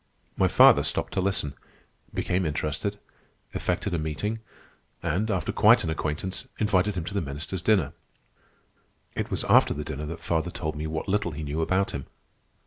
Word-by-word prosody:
My - - +3
father - - +7
stopped - - -1
to 95 - +1
listen, 95 -7 0 0.6
became 90 +1 0
interested, 75 +5 -2 0.6
effected 90 +2 -1
a 85 - +1
meeting, 80 +9 -2 0.6
and, 90 +6 0
after 95 -6 0
quite - - +6
an 80 - -1
acquaintance, 80 +4 -3
invited 105 -1 +2
him 90 - -2
to 95 - -6
the 100 - 0
ministers' 80 +5 -4
dinner. 90 -7 +2 1.2
It - - -2
was - - -1
after - - +5
the 75 - -3
dinner 75 -1 -4
that 85 +1 -6
father 80 0 -1
told 80 -3 -4
me 75 +1 -3
what 80 0 -3
little 95 -4 0
he 75 +2 -5
knew 75 +2 -2
about 95 +4 +1
him. 70 - -5
85 Hz, 170 wpm, -27 LUFS, 75-95 Hz, 1.2 s, father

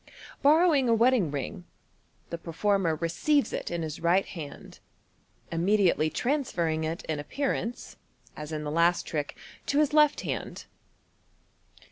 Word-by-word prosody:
Borrow 320 +4 +5
ing 265 -4 +2
a 230 - +5
wedding 235 -6 +3
ring, 145 +7 -5 0.7
the 170 - -4
performer 175 0 0
receives 170 - +1
it - - -3
in 170 -1 -3
his 155 -1 -5
right 175 +4 +3
hand, 155 -6 -9 0.7
im 165 0 -1
mediately 190 -5 +3
transferring 175 - -1
it 165 +6 -4
in 155 -2 -2
appearance 245 - -3 0.4
(as 150 0 -7
in 155 -1 -3
the 150 - -4
last 170 +2 +2
trick) 150 -3 -4 0.3
to 280 - +1
his 295 -1 +3
left 300 -1 +4
hand. - - -5
175 Hz, 140 wpm, -28 LUFS, 160-255 Hz, 0.7 s, Borrow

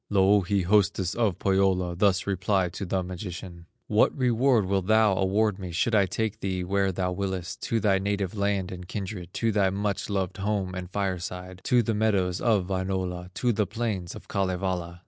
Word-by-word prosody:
Louhi, 100 -1 +3
hostess 95 -1 +2
of 110 -7 0
Pohyola, 95 -2 +1
Thus 95 0 +2
replied 95 -1 0
to 100 - -5
the 95 +1 0
magician: 90 -2 -7 0.2
"What 110 +6 +2
reward 125 -3 +3
wilt 95 -1 0
thou 110 -2 +4
award 100 +2 +1
me, 90 -2 -6
Should 100 +7 0
I 100 -3 +4
take 110 +2 -2
thee 95 -3 -2
where 95 +1 +1
thou 90 0 -1
willest, 95 -1 -4
To 115 - +2
thy 95 -2 +2
native 100 0 -2
land 100 -2 0
and 90 -1 -8
kindred, 95 -2 -5
To 115 -1 +1
thy 100 -2 +2
much 100 +2 -2
loved 95 -2 -2
home 100 -2 -1
and 90 -1 -6
fireside, 90 -1 -4
To 120 -1 +4
the 115 - 0
meadows 100 -4 +1
of 110 -6 +2
Wainola, 95 -2 -2
To 120 -1 +1
the 105 -2 0
plains 105 -5 -3
of - - -11
Kalevala?" 90 -2 -2
95 Hz, 180 wpm, -27 LUFS, 90-105 Hz, 0.2 s, thou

